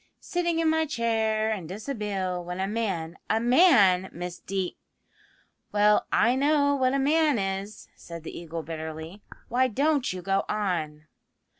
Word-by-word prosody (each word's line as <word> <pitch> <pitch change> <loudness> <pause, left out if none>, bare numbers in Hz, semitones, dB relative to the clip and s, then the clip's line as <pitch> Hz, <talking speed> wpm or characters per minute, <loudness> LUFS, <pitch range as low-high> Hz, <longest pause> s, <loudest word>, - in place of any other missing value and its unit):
Sitting 345 -1 -1
in 330 0 +1
my 320 0 +2
chair 220 -4 0
in 190 -7 -4
dishabille, 195 - -3
when 180 +1 -6
a 190 - 0
man 195 -6 -3
a 220 - +2
Man, 230 - +5
Miss 175 +1 -6
Dee 190 -2 -3 0.5
" - - -37
"Well, 210 0 +3
I 235 +3 +4
know 285 +1 +3
what 260 -1 +1
a - - +2
man 295 0 +3
is," 195 +1 -4
said 170 -1 -10
the - - -8
Eagle 165 -1 -6
bitterly; 160 +3 -7 0.3
"why 255 +2 +2
don't 280 +3 +1
you 180 -1 -6
go 195 +2 +1
on?" 165 -8 -2
210 Hz, 155 wpm, -26 LUFS, 180-260 Hz, 0.5 s, Man